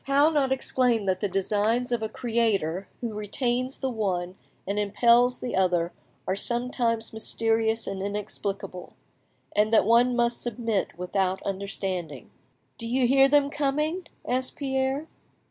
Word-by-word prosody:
how 285 +3 +4
not 280 -4 +1
exclaim 250 -4 +1
that 185 -1 0
the 205 - -1
designs 215 +6 0
of 240 -2 0
a 220 - -2
Creator 210 -8 0
who 235 -3 -3
retains 240 +5 -2
the 265 - -2
one 185 -6 -2 0.3
and 200 +2 -1
impels 235 +4 +4
the 245 - -3
other 180 -2 +2 0.3
are 190 - 0
sometimes 235 0 0
mysterious 225 0 0
and 195 -1 -4
inexplicable, 200 -2 -5 0.6
and 210 +1 +3
that 225 - +5
one 240 +3 +4
must 235 0 +1
submit 225 -6 -2
without 185 +1 -1
understanding? 190 -6 -4 0.5
"Do 230 - -3
you 250 +2 +2
hear 270 +2 +5
them 285 0 +3
coming?" 300 +4 -1 0.2
asked 255 +1 -1
Pierre. 265 +1 -1
230 Hz, 140 wpm, -26 LUFS, 195-250 Hz, 0.6 s, that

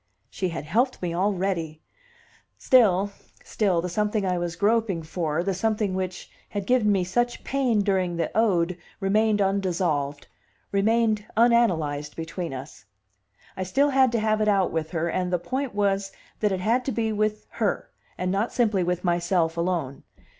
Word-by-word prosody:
She 185 - -2
had 165 - -5
helped 240 - +1
me 170 -1 -1
already! 180 -4 -1 0.8
Still, 205 -6 +4 0.3
still, 190 -6 +1
the - - -1
something 210 +2 0
I 180 -1 0
was 175 -1 -3
groping 210 -4 +1
for, 160 0 -2
the 195 +1 0
something 210 0 0
which 185 -1 -4 0.2
had 200 -2 -4
given 240 -3 +3
me 195 -2 +2
such 240 +7 -1
pain 255 -6 +1
during 190 -3 0
the 170 +2 -2
ode, 180 -5 +2 0.2
remained 210 +1 +2
undissolved, 175 -7 -1 0.5
remained 215 +1 +2
unanalyzed 165 -12 +2
between 165 +1 -5
us; 135 0 -9 0.7
I - - -5
still 275 +10 +2
had 265 -2 +4
to 230 - +2
have 215 0 +1
it 215 - +2
out 195 -3 +2
with 160 -1 -2
her, 170 -1 -1
and 180 +1 -1
the 180 - +2
point 255 +6 -4
was 195 -1 0 0.3
that 210 -1 +1
it 190 -1 -2
had 235 +6 +2
to 270 - -1
be 225 -1 -1
with 215 0 -1
her, - - -1 0.3
and 180 0 -1
not 200 +4 0
simply 215 -6 +1
with 180 0 -1
myself 175 -1 +1
alone. 170 -6 -2
195 Hz, 165 wpm, -25 LUFS, 175-215 Hz, 0.8 s, Still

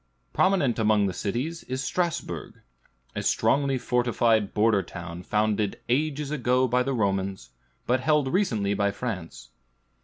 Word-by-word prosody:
Prominent 175 - +2
among 105 -2 +3
its 95 -1 -4
cities 135 +11 -2
is 130 +1 -3
Strasbourg; 175 0 -3 0.6
a - - -2
strongly 140 -1 +2
fortified 120 -4 +1
border 105 -1 +3
town, 85 -1 -8
founded 105 +1 0
ages 145 +2 0
ago 130 -2 +2
by 125 +1 +2
the 135 +2 -1
Romans, 95 - -1 0.3
but 125 +2 +2
held 150 0 +2
recently 115 - +1
by 100 0 +1
France. 100 -5 -6
120 Hz, 130 wpm, -26 LUFS, 100-135 Hz, 0.6 s, among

